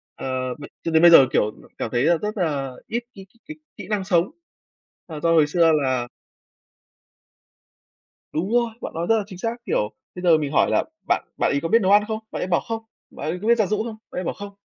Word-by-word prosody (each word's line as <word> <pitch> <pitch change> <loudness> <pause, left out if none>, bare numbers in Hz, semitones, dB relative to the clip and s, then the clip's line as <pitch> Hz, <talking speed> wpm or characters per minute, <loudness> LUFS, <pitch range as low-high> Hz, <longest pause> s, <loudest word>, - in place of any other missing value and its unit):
ờ, 130 -1 -3
b - - -10 0.2
cho 165 - -2
đến 160 0 +4
bây 170 0 +8
giờ, 135 -5 +9
kiểu, 105 - +2 0.3
cảm - - -4
thấy 120 +1 +1
là 170 +2 +4
rất 210 +4 -4
là 145 -7 -1 0.2
ít 235 +2 -2
cái 195 -2 -11 0.2
kỹ 310 - -7 0.2
kỹ - - -8
năng 205 -3 0
sống, 180 +1 +1 0.8
là 155 -2 -6
do 165 - +2
hồi 155 -3 +5
xưa 165 +1 +4
là 130 -3 0 2.3
Đúng 175 +6 -2
rồi! 240 -1 +2
Bạn - - -6
nói 165 +1 -2
rất 225 - +4
là 210 - -2
chính 190 -4 -11
xác, 230 +4 -2
kiểu, 105 - 0 0.2
bây 180 - -7
giờ 170 -3 +5
mình 145 -2 -3
hỏi - - +3
là - - +2 0.2
bạn - - +1
bạn - - +2
ấy 140 - 0
có 165 - -1
biết 230 +3 +4
nấu 190 - +2
ăn 205 +1 +6
không? 220 -1 -2
Bạn - - -4
ấy - - -1
bảo: 180 -2 +2
"Không." 225 0 -5 0.3
Bạn - - -6
ấy 180 - -3
có 215 - -2
biết 235 0 +5
giặt 215 -4 +2
giũ 210 - +1
không? 225 -2 -6
Bạn - - -6
ấy 185 - -3
bảo: - - -2
"Không." 200 0 -9
175 Hz, 245 wpm, -23 LUFS, 150-210 Hz, 2.3 s, giờ